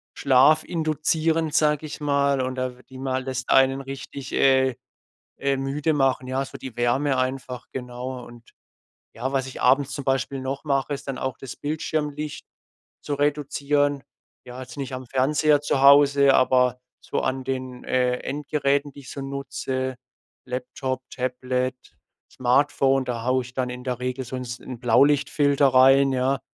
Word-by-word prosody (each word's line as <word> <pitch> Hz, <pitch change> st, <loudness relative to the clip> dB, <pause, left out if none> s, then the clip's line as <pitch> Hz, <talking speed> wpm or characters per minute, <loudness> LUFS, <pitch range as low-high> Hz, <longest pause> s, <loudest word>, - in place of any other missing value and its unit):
schlafinduzierend, 155 Hz, +3 st, +2 dB
sage 150 Hz, 0 st, +2 dB
ich 150 Hz, -, -8 dB
mal 140 Hz, -2 st, +2 dB
und 130 Hz, 0 st, -2 dB
da 130 Hz, -1 st, -3 dB
w 125 Hz, -, -17 dB
die 130 Hz, -, -11 dB
mal 130 Hz, -1 st, -2 dB
das 130 Hz, -1 st, -4 dB
einen 135 Hz, 0 st, +4 dB
richtig, 135 Hz, 0 st, -8 dB
äh 130 Hz, -1 st, +3 dB, 0.6 s
äh, 140 Hz, 0 st, 0 dB
müde 140 Hz, +3 st, -1 dB
machen, 135 Hz, -2 st, +1 dB
ja, 135 Hz, +1 st, -1 dB
so -, -, -9 dB
die 130 Hz, -3 st, -9 dB
Wärme 130 Hz, +4 st, +1 dB
einfach, 130 Hz, -1 st, -3 dB
genau. 125 Hz, 0 st, -6 dB
Und 120 Hz, -1 st, -15 dB, 0.6 s
ja, 125 Hz, +4 st, -3 dB
was 135 Hz, -1 st, 0 dB
ich 130 Hz, -, -7 dB
abends 135 Hz, +2 st, +3 dB
zum 140 Hz, -, -4 dB
Beispiel 135 Hz, 0 st, -1 dB
noch 135 Hz, +2 st, -4 dB
mache, 140 Hz, -1 st, 0 dB
ist 140 Hz, -, -9 dB
dann 135 Hz, -, -3 dB
auch 130 Hz, 0 st, -4 dB
das 135 Hz, -, -8 dB
Bildschirmlicht 150 Hz, 0 st, -3 dB, 0.6 s
zu 145 Hz, -, -3 dB
reduzieren. 145 Hz, 0 st, 0 dB, 0.4 s
Ja, 125 Hz, +1 st, -9 dB
jetzt 125 Hz, 0 st, -10 dB
nicht 135 Hz, -2 st, -5 dB
am 130 Hz, 0 st, -6 dB
Fernseher 145 Hz, +4 st, +2 dB
zu 140 Hz, -2 st, 0 dB
Hause, 140 Hz, 0 st, +6 dB
aber 125 Hz, -1 st, +3 dB, 0.2 s
so -, -, -2 dB
an 130 Hz, 0 st, -2 dB
den, 130 Hz, -1 st, -5 dB
äh, 125 Hz, -1 st, +1 dB
Endgeräten, 145 Hz, -1 st, -1 dB
die -, -, -12 dB
ich 130 Hz, -, -11 dB
so 140 Hz, -, -7 dB
nutze, 135 Hz, -1 st, -4 dB, 0.5 s
Laptop, 130 Hz, +1 st, -4 dB
Tablet, 125 Hz, 0 st, -2 dB, 0.6 s
Smartphone, 135 Hz, +1 st, +2 dB
da 120 Hz, -2 st, -4 dB
haue 130 Hz, 0 st, +2 dB
ich 125 Hz, -, -13 dB
dann 125 Hz, -1 st, -1 dB
in 125 Hz, 0 st, -7 dB
der 125 Hz, -2 st, -3 dB
Regel 125 Hz, +1 st, -3 dB
so 130 Hz, +1 st, -6 dB
'n 125 Hz, -, -4 dB
s 125 Hz, +1 st, -6 dB
'n 125 Hz, -3 st, -8 dB
Blaulichtfilter 140 Hz, +3 st, +3 dB
rein, 135 Hz, +1 st, +5 dB
ja. 130 Hz, +1 st, +1 dB
135 Hz, 165 wpm, -24 LUFS, 130-140 Hz, 0.6 s, Hause